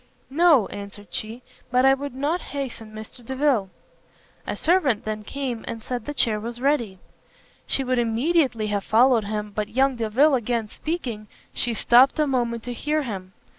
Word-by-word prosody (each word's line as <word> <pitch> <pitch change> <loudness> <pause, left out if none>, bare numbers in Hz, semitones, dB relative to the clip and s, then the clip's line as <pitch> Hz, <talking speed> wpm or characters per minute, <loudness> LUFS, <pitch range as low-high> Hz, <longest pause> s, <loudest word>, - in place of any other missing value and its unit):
"No," 310 - +5
answered 200 -1 -9
she, 225 +3 -5 0.3
"but 250 +1 +3
I 270 - +7
would 275 -1 -4
not 295 +6 -1
hasten 255 -6 -6
Mr 220 +3 -10
Delvile." 260 -5 +1 0.8
A - - -2
servant 310 - +2
then 215 0 -3
came, 250 0 -4
and 225 -1 -5
said 245 -2 -4
the 295 - -4
chair 220 -5 +2
was 235 +2 -6
ready. 245 -8 0 0.7
She 270 - 0
would 255 -1 +1
immediately 240 0 +1
have 205 -1 -1
followed 230 0 +4
him, 210 0 -3
but 210 0 -3
young 265 +1 +2
Delvile 235 +7 +3
again 235 -3 0
speaking, 240 -9 -4 0.3
she 240 -2 -1
stopt 245 +5 +5
a 305 - +3
moment 240 -4 -1
to 245 - -5
hear 300 +5 -1
him. 190 -6 -6
240 Hz, 170 wpm, -24 LUFS, 215-275 Hz, 0.8 s, I